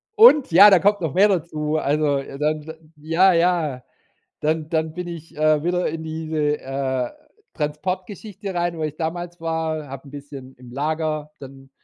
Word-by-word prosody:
Und 410 Hz, -, +7 dB
ja, 195 Hz, +5 st, +9 dB
da 190 Hz, -3 st, +6 dB
kommt 205 Hz, +1 st, +2 dB
noch 160 Hz, -5 st, -2 dB
mehr 200 Hz, +3 st, +5 dB
dazu. 155 Hz, -4 st, -1 dB
Also, 145 Hz, -1 st, +1 dB
äh, 135 Hz, 0 st, -7 dB
dann, 150 Hz, +1 st, 0 dB
äh 160 Hz, -, -7 dB, 0.2 s
ja, 165 Hz, +5 st, +3 dB
ja. 165 Hz, -7 st, +1 dB, 0.6 s
Dann 155 Hz, 0 st, -1 dB
dann 160 Hz, -1 st, -1 dB
bin 180 Hz, +1 st, -5 dB
ich, 165 Hz, -2 st, -9 dB
äh, 155 Hz, -1 st, +3 dB
wieder 180 Hz, +1 st, 0 dB
in 160 Hz, 0 st, -5 dB
diese, 155 Hz, -2 st, -2 dB
äh, 130 Hz, -2 st, -2 dB, 0.4 s
Transportgeschichte 185 Hz, +6 st, -4 dB
rein, 175 Hz, -1 st, -1 dB
wo 160 Hz, -, -3 dB
ich 155 Hz, -1 st, -4 dB
damals 175 Hz, +2 st, -4 dB
war, 160 Hz, -2 st, -2 dB
habe 135 Hz, 0 st, -9 dB
’n 140 Hz, -, -13 dB
bisschen 140 Hz, -2 st, -10 dB
im 125 Hz, -1 st, -14 dB
Lager 155 Hz, +2 st, -2 dB
dann, 135 Hz, 0 st, -12 dB
155 Hz, 170 wpm, -22 LUFS, 150-175 Hz, 0.6 s, ja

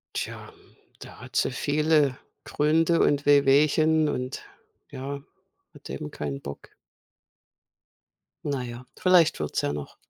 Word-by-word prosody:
Tja, -, -, -5 dB, 0.5 s
da -, -, -12 dB
hat -, -, -6 dB
sie -, -, +2 dB
viele 150 Hz, -2 st, +1 dB, 0.3 s
Gründe 160 Hz, +3 st, +2 dB
und 145 Hz, 0 st, +2 dB
Wehwehchen. 150 Hz, +2 st, +4 dB
Und 125 Hz, +1 st, -4 dB, 0.5 s
ja, 140 Hz, +2 st, -6 dB, 0.5 s
hat -, -, -13 dB
eben 70 Hz, +3 st, -6 dB
keinen 70 Hz, -2 st, -5 dB
Bock. 70 Hz, 0 st, -9 dB, 1.7 s
Na 140 Hz, -3 st, -2 dB
ja, 120 Hz, +1 st, -8 dB
vielleicht 180 Hz, -3 st, +4 dB
wird's 75 Hz, -1 st, -2 dB
ja 70 Hz, -, -1 dB
noch. 75 Hz, -1 st, -7 dB
140 Hz, 120 wpm, -26 LUFS, 125-155 Hz, 1.7 s, Wehwehchen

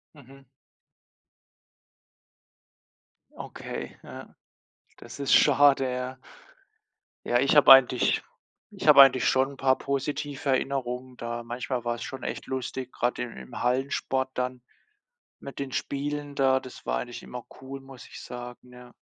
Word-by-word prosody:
Mhm. 135 Hz, -1 st, -16 dB, 2.9 s
Okay, -, -, -7 dB
ja. -, -, -11 dB, 0.6 s
Das 120 Hz, 0 st, -12 dB
ist 140 Hz, -, 0 dB
schade, 140 Hz, -2 st, +5 dB
ja. 125 Hz, +1 st, -5 dB, 1.1 s
Ja, 120 Hz, -, +2 dB
ich 140 Hz, +4 st, +2 dB
habe 145 Hz, -2 st, +8 dB
eigentlich 130 Hz, -2 st, +6 dB, 0.5 s
ich -, -, -7 dB
habe -, -, +10 dB
eigentlich 130 Hz, -2 st, +5 dB
schon 135 Hz, +1 st, +2 dB
'n -, -, -15 dB
paar 130 Hz, 0 st, +2 dB
positive 140 Hz, +1 st, -3 dB
Erinnerungen 130 Hz, -1 st, -2 dB
da. 120 Hz, 0 st, -5 dB
Manchmal 120 Hz, +1 st, -4 dB
war 120 Hz, 0 st, -1 dB
es -, -, -7 dB
schon 135 Hz, -1 st, -7 dB
echt -, -, -5 dB
lustig, 130 Hz, -1 st, -4 dB
grade 120 Hz, 0 st, -2 dB
im 120 Hz, -, -8 dB
im 65 Hz, -1 st, -9 dB
Hallensport 130 Hz, +1 st, -1 dB
dann 125 Hz, -1 st, -3 dB, 0.8 s
mit 140 Hz, -, -9 dB
den 140 Hz, -1 st, -5 dB
Spielen 145 Hz, +1 st, -3 dB
da, 130 Hz, -1 st, +3 dB
das 130 Hz, -1 st, -12 dB
war -, -, 0 dB
eigentlich 120 Hz, -, -7 dB
immer 125 Hz, -1 st, -8 dB, 0.2 s
cool, 135 Hz, +1 st, -8 dB
muss 135 Hz, -1 st, -13 dB
ich -, -, -11 dB
sagen, 125 Hz, 0 st, -9 dB
ja. 125 Hz, 0 st, -14 dB
130 Hz, 140 wpm, -27 LUFS, 125-135 Hz, 2.9 s, habe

